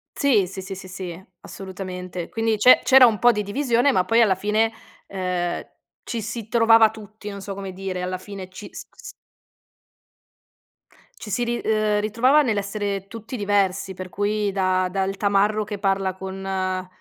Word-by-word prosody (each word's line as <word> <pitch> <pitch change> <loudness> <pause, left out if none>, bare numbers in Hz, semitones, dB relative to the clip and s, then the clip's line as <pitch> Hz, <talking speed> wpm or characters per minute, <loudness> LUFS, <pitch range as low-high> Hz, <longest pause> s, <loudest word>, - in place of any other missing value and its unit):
Sì, 220 -10 +3
sì, 190 +1 -7
sì, 195 +1 -7
sì, 185 0 -10
sì, 185 -1 -7 0.2
assolutamente 185 -2 -7
quindi 225 -1 0
c'è 250 +5 +7
c'era 265 -1 +8
un 220 -4 +2
po' 245 - +6
di 210 -2 -2
divisione 245 +4 +1
ma 185 - +3
poi 230 +5 +3
alla 195 -4 +4
fine, 215 +3 +1 0.4
ehm, 180 -2 -2 0.4
ci 230 -2 -4
si 225 0 -6
trovava 225 -1 +6
tutti, 215 -1 -10
non 200 -1 -7
so 195 +1 -6
come 195 -1 -6
dire, 185 -1 -5
alla 185 0 -3
fine 190 -1 -9
ci 190 +2 -10
s - - -9
s 475 - -11 2.1
ci 210 - -7
si 240 +6 0
ri 240 0 -1
uhm, 215 -1 +1
ritrovava 245 +8 +3
nell'essere 200 -3 -2
tutti 230 +3 -8
diversi 200 -2 0
per 185 0 -7
cui 205 +1 -1
da 185 -1 +1
dal 195 +1 -2
tamarro 205 +1 +2
che 205 0 -5
parla 195 -1 0
con 190 -1 -4
200 Hz, 165 wpm, -23 LUFS, 190-220 Hz, 2.1 s, c'era